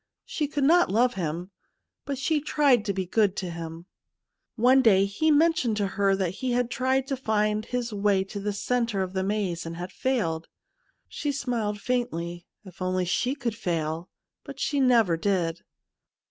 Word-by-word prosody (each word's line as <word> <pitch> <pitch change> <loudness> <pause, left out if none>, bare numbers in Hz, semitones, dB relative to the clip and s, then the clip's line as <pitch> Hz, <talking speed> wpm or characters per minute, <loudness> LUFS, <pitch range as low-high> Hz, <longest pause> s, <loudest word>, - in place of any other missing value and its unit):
She 300 - -2
could 290 -1 -2
not 345 +5 +5
love 240 +4 +3
him, 175 0 -4 0.5
but 280 -1 -3
she 300 +3 0
tried 280 -7 +3
to 200 - 0
be 190 -1 -2
good 205 +1 +2
to 180 -2 -4
him. 165 0 -7 0.7
One 255 +3 +5
day 200 -5 +5
he 200 +11 0
men 320 +2 +5
tioned 235 -8 -1
to 205 - +1
her 195 0 +2
that 190 -3 -1
he 255 -2 0
had 245 0 0
tried 260 +1 +1
to 270 - -2
find 215 -3 0
his 245 -2 -3
way 200 -2 +2
to 200 +1 -7
the 205 +1 -2
centre 230 -1 -1
of 185 0 -6
the 190 - 0
maze, 195 -4 -1
and 165 0 -6
had 180 +2 -6
failed. 170 -12 -1 0.6
She 295 - -3
smiled 235 -6 -2
faintly. 175 -9 -3 0.2
If 185 -1 -14
only 185 0 0
she 250 +9 0
could 240 -6 -3
fail! 165 -3 -3 0.3
But - - -10
she 285 - 0
never 230 -10 +4
did. 170 -3 0
210 Hz, 180 wpm, -26 LUFS, 185-255 Hz, 0.7 s, not